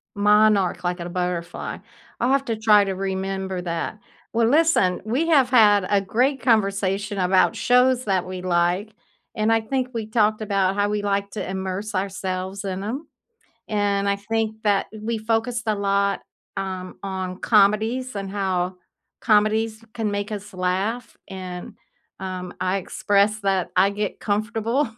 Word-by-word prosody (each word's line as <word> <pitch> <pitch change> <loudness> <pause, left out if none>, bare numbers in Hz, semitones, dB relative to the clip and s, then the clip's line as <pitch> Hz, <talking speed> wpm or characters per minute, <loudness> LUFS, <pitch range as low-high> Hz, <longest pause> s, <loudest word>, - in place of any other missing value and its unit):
Monarch, 205 -2 +3
like 175 0 -1
in 170 - -5
a - - -7
butterfly. 180 -1 -3 0.4
I'll 245 +2 +2
have 275 0 +2
to 230 - -1
try 215 -1 +5
to 195 -1 -2
remember 190 -1 -3
that. 170 +4 -4 0.3
Well, 230 0 +3
listen, 295 - +3
we 260 +9 0
have 280 -6 +4
had 210 -6 +5
a 205 - +4
great 250 +8 +1
conversation 200 -3 +1
about 185 0 +3
shows 250 +1 +3
that 190 -3 +1
we 185 0 -6
like, 180 +4 0 0.4
and 215 -1 +1
I 225 0 +3
think 255 +3 -2
we 225 -2 -3
talked 215 -1 +2
about 195 -2 +1
how 205 0 +1
we 210 0 -1
like 200 0 -1
to 210 - -5
immerse 190 +2 -4
ourselves 190 0 -3
in 190 -1 -4
'em, 255 +10 -4 0.6
and 200 -1 +1
I 200 - +2
think 220 +1 -2
that 205 -2 +2
we 225 +2 -2
focused 225 +2 -1
a 215 - +2
lot, 200 0 +1 0.3
um, 185 -1 -5
on 190 -2 -4
comedies 220 +4 +2
and 195 -1 -4
how 185 -2 -1 0.4
comedies 220 0 +2
can 225 -3 -1
make 205 +1 -3
us 205 0 -6
laugh, 190 +6 -2
and, 185 -2 -7 0.5
um, 185 -1 -5
I 185 +1 +1
expressed 205 +3 +1
that 195 -2 0
I 190 +2 +5
get 205 0 -3
comfortable 225 +5 0
205 Hz, 155 wpm, -23 LUFS, 190-220 Hz, 0.6 s, try